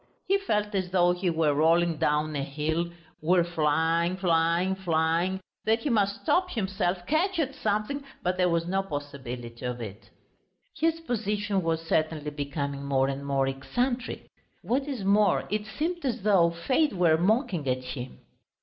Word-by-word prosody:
He 395 +1 +2
felt 210 - -1
as 185 -2 -1
though 175 -1 +4
he 180 +1 0
were 160 -3 +2
rolling 165 +2 +3
down 150 +1 +1
a 140 - -1
hill, 155 +4 -1 0.3
were 175 +3 +4
flying, 165 +2 +1
flying, 170 0 +2
flying, 175 0 0 0.3
that 225 +1 +2
he 290 - -1
must 200 -3 +1
stop 360 +4 +2
himself, 190 - -1
catch 345 - +1
at 280 -4 0
something, 215 +7 -1 0.2
but 180 +1 +1
there 180 -1 +2
was 170 0 +1
no 190 +2 0
possibility 135 -8 -6
of 125 -1 -3
it. 110 -1 -8 0.7
His 330 0 +1
position 210 -7 -1
was 165 -1 0
certainly 155 -2 0
becoming 140 -1 -3
more 135 -1 +1
and 140 +1 -4
more 140 -1 +1
eccentric. 240 - -2 0.4
What 270 +4 0
is 260 -8 -4
more, 200 0 +3
it 210 0 -1
seemed 340 +9 -3
as 245 -6 -2
though 190 -5 +5
fate 255 - +1
were 170 -4 +4
mocking 185 - +1
at 130 0 -1
him. 125 0 -7
175 Hz, 160 wpm, -27 LUFS, 150-210 Hz, 0.7 s, though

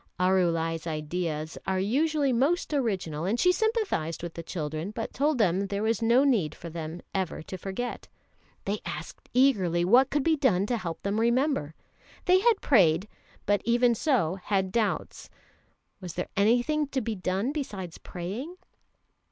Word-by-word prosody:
Arulai's 170 -3 +1
ideas 155 0 -3
are 190 0 +1
usually 280 +6 +1
most 295 +7 +1
original, 190 - -1
and 220 +6 0
she 360 - +5
sympathised 400 - -1
with 170 -1 -5
the 170 - -6
children, 155 0 -4
but 220 +1 -5
told 290 +1 +1
them 195 -2 +2
there 200 +1 -2
was 225 -1 +1
no 235 +4 +4
need 215 - +2
for 170 - -9
them 160 +1 -6
ever 190 -5 -2
to 185 - -7
forget. 195 +6 -5 0.6
They 205 +2 -1
asked - - -7
eagerly 190 -10 +3
what 250 +8 +5
could 290 -1 0
be 325 +1 +3
done 225 -10 +2
to 240 +2 -1
help 170 -6 -5
them 200 +1 -1
to - - +1
remember. 235 - +1 0.5
They 365 0 +5
had 450 +1 +3
prayed, 185 - +4 0.4
but 205 0 +2
even 240 +1 +3
so 210 - +1
had 190 -2 0
doubts. 220 -2 -2 0.7
Was 180 -3 -8
there 180 - -3
anything 245 +9 +2
to 275 -1 -1
be 225 -2 -2
done 190 +5 -1
besides 200 - -5
praying? 210 - -6
205 Hz, 160 wpm, -27 LUFS, 175-260 Hz, 0.7 s, she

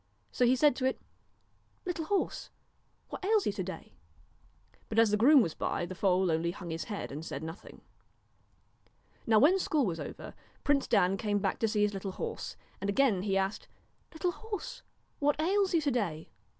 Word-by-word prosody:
So 250 - +2
he 255 - +5
said 290 0 +4
to 260 - -1
it: 260 - 0 0.4
' - - -40
Little 345 -3 -3
horse! 400 +3 -1 0.6
what - - -7
ails 420 0 +3
you - - +1
to 200 -1 -4
day? 190 +1 -8 0.5
' - - -33
but 220 - -4
as 225 -2 +5
the - - +4
groom 265 +6 +7
was 165 - -3
by, - - -2
the 185 - -7
foal 185 -1 +2
only 160 +1 0
hung 175 -1 -6
his 165 +1 -4
head 205 -9 -5
and 150 +3 -6
said 145 -2 -6
nothing. 160 +3 -9 1.5
Now 220 -1 +5
when 320 - +5
school 305 -6 +1
was 170 -4 -2
over, - - -7 0.3
Prince 285 -2 +2
Dan 185 +2 +3
came 205 0 0
back 195 -1 -1
to 225 - +2
see 210 -1 +1
his 210 0 +1
little 195 -1 -4
horse, - - -5 0.3
and 200 - -2
again 210 -3 +3
he 195 0 0
asked: 195 +2 -2 0.2
' - - -41
Little 350 +2 -1
horse! 445 +5 -6 0.4
what 290 +1 +1
ails 380 +3 +2
you 325 - +3
to 290 -2 +1
day 175 -11 -2
215 Hz, 200 wpm, -31 LUFS, 190-305 Hz, 1.5 s, groom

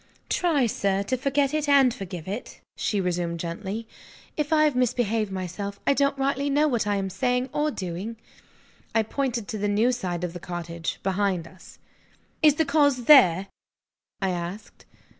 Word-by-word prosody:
"Try, 320 -8 +2
sir, 200 -3 0
to 255 - -1
forget 275 +2 0
it 305 -1 0
and 270 -4 +5
forgive 180 -6 -7
it," 205 +6 -6 0.2
she 205 - -1
resumed 175 -2 -1
gently, 195 +7 -5 0.5
"if 300 0 -2
I 310 -1 +5
have 300 -3 +2
misbehaved 225 -4 +1
myself. 190 +2 -5
I - - +4
don't 280 0 +1
rightly 275 +1 0
know 295 +2 +3
what 235 -7 0
I 205 - +1
am 195 -1 -1
saying 250 +6 0
or 300 +1 +1
doing." 190 - -5 0.8
I 225 - +4
pointed 240 -2 -2
to 215 - -4
the 205 - 0
new 215 +5 +3
side 180 -8 -3
of 175 -1 -3
the 175 - -7
cottage, 170 -1 -5
behind 190 -3 0
us. 185 +1 -16 0.6
"Is 300 -2 +6
the 320 - +1
cause 285 -3 +2
there?" 195 - +7 0.7
I 190 -1 0
asked. 175 +4 -6
215 Hz, 170 wpm, -25 LUFS, 185-275 Hz, 0.8 s, there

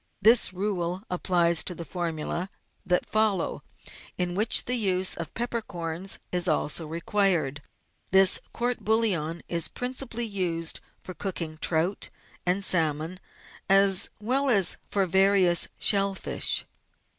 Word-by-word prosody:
This 225 -1 +5
rule 185 -2 -2
also 185 +2 -10
applies 175 -2 +1
to 180 - -4
the 170 - -7
formula; 170 +2 -4 0.3
that 180 -2 0
follow, 215 -5 0 0.6
in 180 -1 -2
which 215 +5 +4
the 250 - +1
use 190 -6 +1
of 165 -1 -5
peppercorns 195 -7 -3
is 180 0 0
also 155 0 0
required. 165 -4 -1 0.5
This 190 -1 +5
court 245 +1 -2
bouillon 185 -8 0
is 170 -2 0
principally 250 -1 -3
used 175 -6 -2 0.2
for 185 - -10
cooking 165 -5 -5
trout 170 +5 -1 0.4
and 190 +2 +2
salmon, 160 +1 +2 0.5
as 195 -1 +4
well 265 +6 0
as 200 -7 +4
for 195 -2 +1
various 190 -1 +3
shell 195 -1 +3
fish. - - +1
185 Hz, 125 wpm, -26 LUFS, 170-205 Hz, 0.6 s, This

